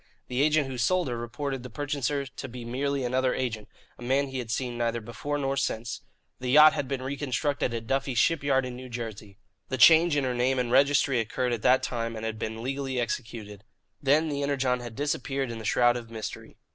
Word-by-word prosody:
The 125 Hz, +2 st, 0 dB
agent 155 Hz, 0 st, +3 dB
who 130 Hz, -2 st, -5 dB
sold 180 Hz, +9 st, +2 dB
her 120 Hz, -, -2 dB
reported 130 Hz, +3 st, -4 dB
the 125 Hz, -, -8 dB
purchaser 140 Hz, +3 st, -2 dB
to 130 Hz, 0 st, -8 dB
be 120 Hz, 0 st, -8 dB
merely 135 Hz, +3 st, -1 dB
another 125 Hz, +1 st, +1 dB
agent, 115 Hz, -5 st, -3 dB, 0.3 s
a -, -, -13 dB
man 135 Hz, +3 st, +1 dB
he 130 Hz, -1 st, -4 dB
had 120 Hz, -2 st, -5 dB
seen 120 Hz, +1 st, -2 dB
neither 120 Hz, 0 st, -1 dB
before 120 Hz, +6 st, -4 dB
nor 135 Hz, -1 st, -1 dB
since. 120 Hz, -4 st, -2 dB, 0.4 s
The 125 Hz, -, -3 dB
yacht 150 Hz, +3 st, +8 dB
had 135 Hz, -, -2 dB
been 130 Hz, -1 st, -3 dB
reconstructed 140 Hz, 0 st, -1 dB
at 115 Hz, -1 st, -4 dB
Duffey's 135 Hz, 0 st, -1 dB
Shipyard 140 Hz, -5 st, +2 dB
in 125 Hz, -1 st, -6 dB
New 130 Hz, +1 st, -9 dB
Jersey. 110 Hz, -4 st, -7 dB, 0.3 s
The 130 Hz, -, -2 dB
change 160 Hz, +4 st, +7 dB
in 140 Hz, -, +1 dB
her 130 Hz, -1 st, 0 dB
name 125 Hz, +2 st, +1 dB
and 125 Hz, -2 st, -1 dB
registry 140 Hz, -1 st, +4 dB
occurred 120 Hz, +3 st, -1 dB
at 115 Hz, -, -3 dB
that 130 Hz, +4 st, +4 dB
time 115 Hz, -1 st, -2 dB
and 110 Hz, 0 st, -5 dB
had 110 Hz, -1 st, -4 dB
been 110 Hz, +1 st, -4 dB
legally 135 Hz, 0 st, -2 dB
executed. 110 Hz, -4 st, -4 dB, 0.4 s
Then 145 Hz, +3 st, +3 dB
the 145 Hz, -2 st, -2 dB
Energon 135 Hz, -3 st, +1 dB
had 120 Hz, -2 st, -8 dB
disappeared 135 Hz, -2 st, -2 dB
in 115 Hz, -, -6 dB
the 110 Hz, -, -8 dB
shroud 120 Hz, +2 st, +4 dB
of 120 Hz, -2 st, -6 dB
mystery. 110 Hz, -2 st, -7 dB
130 Hz, 210 wpm, -27 LUFS, 120-140 Hz, 0.4 s, yacht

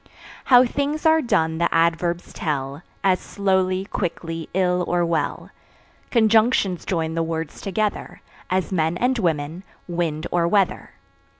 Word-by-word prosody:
How 250 Hz, -1 st, +7 dB
things 285 Hz, +5 st, -2 dB
are 320 Hz, 0 st, +5 dB
done 165 Hz, -, 0 dB
the 170 Hz, -, +1 dB
Adverbs 170 Hz, +1 st, 0 dB
tell 140 Hz, -2 st, -3 dB, 0.2 s
As 185 Hz, -2 st, +3 dB
slowly, 190 Hz, -1 st, 0 dB
quickly, 165 Hz, -4 st, -4 dB
ill 180 Hz, -1 st, +2 dB
or 175 Hz, 0 st, +1 dB
well. 165 Hz, -2 st, -2 dB, 0.6 s
Conjunctions 220 Hz, -5 st, +3 dB
join 160 Hz, -3 st, -1 dB
the 165 Hz, -, -1 dB
words 165 Hz, -1 st, -4 dB
together 205 Hz, +1 st, -3 dB, 0.3 s
As 185 Hz, +1 st, -1 dB
men 165 Hz, -1 st, 0 dB
and 250 Hz, +4 st, +1 dB
women, 160 Hz, -2 st, -1 dB, 0.3 s
wind 170 Hz, -3 st, -2 dB
or 170 Hz, -1 st, +2 dB
weather. 195 Hz, +1 st, 0 dB
175 Hz, 130 wpm, -22 LUFS, 165-200 Hz, 0.6 s, How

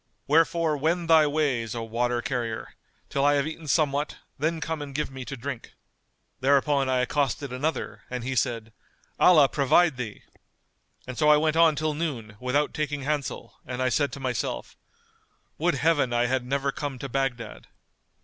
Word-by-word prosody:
Wherefore 160 Hz, +1 st, +2 dB
wend 165 Hz, +4 st, 0 dB
thy 155 Hz, -2 st, +7 dB
ways, 135 Hz, -7 st, 0 dB
O 115 Hz, -, -3 dB
water 120 Hz, +1 st, -1 dB
carrier, 115 Hz, -3 st, -3 dB, 0.3 s
till 140 Hz, -, -1 dB
I 145 Hz, 0 st, +4 dB
have 140 Hz, 0 st, +1 dB
eaten 160 Hz, 0 st, -7 dB
somewhat: 145 Hz, -1 st, +1 dB, 0.2 s
then 160 Hz, +3 st, 0 dB
come 160 Hz, 0 st, -3 dB
and 140 Hz, -2 st, -7 dB
give 150 Hz, -1 st, -2 dB
me 130 Hz, -1 st, -7 dB
to 135 Hz, -, -6 dB
drink." 125 Hz, 0 st, -6 dB, 0.7 s
Thereupon 140 Hz, 0 st, +2 dB
I 130 Hz, -1 st, +2 dB
accosted 140 Hz, 0 st, -1 dB
another 150 Hz, +6 st, -3 dB
and 125 Hz, -1 st, -4 dB
he 130 Hz, +1 st, -3 dB
said:—Allah 120 Hz, -, +2 dB
provide 145 Hz, +1 st, +3 dB
thee! 115 Hz, -4 st, -6 dB, 0.8 s
And 130 Hz, -1 st, -7 dB
so 150 Hz, -, +4 dB
I 150 Hz, -, +7 dB
went 155 Hz, +1 st, +1 dB
on 165 Hz, -2 st, +5 dB
till 155 Hz, +1 st, -1 dB
noon, 130 Hz, -10 st, -4 dB
without 135 Hz, +4 st, 0 dB
taking 145 Hz, -2 st, -2 dB
hansel, 145 Hz, -1 st, -3 dB
and 125 Hz, -1 st, -6 dB
I 130 Hz, 0 st, +2 dB
said 145 Hz, +3 st, +1 dB
to -, -, -6 dB
myself, 125 Hz, -, -3 dB, 0.8 s
'Would 170 Hz, 0 st, +2 dB
Heaven 145 Hz, -3 st, +2 dB
I 120 Hz, 0 st, +2 dB
had 125 Hz, 0 st, -1 dB
never 140 Hz, +1 st, 0 dB
come 140 Hz, -1 st, -5 dB
to 140 Hz, -, -5 dB
Baghdad! 120 Hz, -, -3 dB
140 Hz, 170 wpm, -26 LUFS, 125-150 Hz, 0.8 s, thy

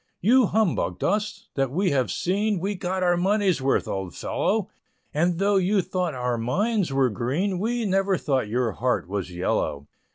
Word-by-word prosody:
You 240 Hz, +4 st, +4 dB
humbugged 215 Hz, -4 st, 0 dB
us 210 Hz, +2 st, -1 dB
that 135 Hz, -2 st, 0 dB
we 185 Hz, +7 st, 0 dB
have 130 Hz, -3 st, +1 dB
seen, 200 Hz, +2 st, 0 dB
We 195 Hz, +4 st, -1 dB
got 185 Hz, 0 st, -2 dB
our 175 Hz, -1 st, +3 dB
money's 190 Hz, -2 st, +2 dB
worth, 135 Hz, +1 st, +1 dB
old 95 Hz, -3 st, -4 dB
fellow, 210 Hz, -1 st, -1 dB, 0.4 s
And 170 Hz, +3 st, +1 dB
though 200 Hz, +2 st, +2 dB
you 190 Hz, +1 st, +2 dB
thought 180 Hz, -5 st, -2 dB
our 125 Hz, -1 st, -1 dB
minds 190 Hz, -, 0 dB
were 135 Hz, -2 st, +2 dB
green, 160 Hz, -, -1 dB
We 230 Hz, +3 st, -1 dB
never 195 Hz, -1 st, +1 dB
thought 135 Hz, -9 st, 0 dB
your 120 Hz, 0 st, 0 dB
heart 125 Hz, +1 st, -1 dB
was 95 Hz, -1 st, -4 dB
yellow. 80 Hz, -5 st, -1 dB
180 Hz, 170 wpm, -25 LUFS, 130-200 Hz, 0.4 s, You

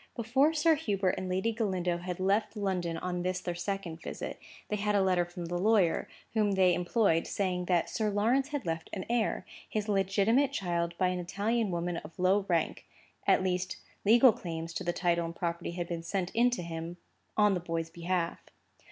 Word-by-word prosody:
Before 260 Hz, +6 st, +3 dB
Sir 320 Hz, +1 st, +4 dB
Hubert 205 Hz, -11 st, 0 dB
and 185 Hz, -, -4 dB
Lady 190 Hz, +5 st, +1 dB
Galindo 185 Hz, -6 st, -1 dB
had 180 Hz, +1 st, -5 dB
left 205 Hz, +4 st, +1 dB
London 180 Hz, -5 st, -1 dB
on 180 Hz, 0 st, -3 dB
this, 185 Hz, 0 st, -1 dB
their 175 Hz, -, -3 dB
second 175 Hz, -2 st, -4 dB
visit, -, -, -6 dB, 0.3 s
they 210 Hz, -, -1 dB
had 210 Hz, 0 st, 0 dB
a 200 Hz, -, +4 dB
letter 180 Hz, -2 st, +2 dB
from 175 Hz, 0 st, -7 dB
the 175 Hz, +1 st, -2 dB
lawyer, 200 Hz, -4 st, +3 dB, 0.3 s
whom 210 Hz, -3 st, +2 dB
they 185 Hz, -2 st, +4 dB
employed, 175 Hz, -1 st, +2 dB
saying 180 Hz, -2 st, -1 dB
that 175 Hz, -2 st, +2 dB
Sir 215 Hz, -1 st, -1 dB
Lawrence 230 Hz, +7 st, +2 dB
had 290 Hz, -5 st, -4 dB
left 165 Hz, -1 st, -3 dB
an 190 Hz, -, -4 dB
heir, 235 Hz, -2 st, 0 dB, 0.2 s
his 215 Hz, -1 st, -2 dB
legitimate 205 Hz, +7 st, +2 dB
child 170 Hz, -7 st, -1 dB
by 185 Hz, -1 st, +2 dB
an 180 Hz, 0 st, -2 dB
Italian 205 Hz, +5 st, 0 dB
woman 175 Hz, 0 st, -2 dB
of 165 Hz, -, -9 dB
low 190 Hz, +2 st, +2 dB
rank; 165 Hz, -3 st, 0 dB, 0.4 s
at -, -, +4 dB
least, 185 Hz, 0 st, -1 dB, 0.3 s
legal 235 Hz, +3 st, +7 dB
claims 165 Hz, -2 st, -5 dB
to 165 Hz, -, -3 dB
the 175 Hz, -, 0 dB
title 170 Hz, -1 st, +1 dB
and 165 Hz, 0 st, -5 dB
property 170 Hz, 0 st, -3 dB
had 175 Hz, -1 st, -3 dB
been 170 Hz, -1 st, -3 dB
sent 180 Hz, +2 st, -2 dB
into 240 Hz, -3 st, +2 dB
him 165 Hz, +1 st, -5 dB, 0.4 s
on 210 Hz, -1 st, +5 dB
the 180 Hz, -, 0 dB
boy's 165 Hz, -1 st, -3 dB
behalf. 170 Hz, 0 st, -1 dB
185 Hz, 190 wpm, -30 LUFS, 175-210 Hz, 0.4 s, legal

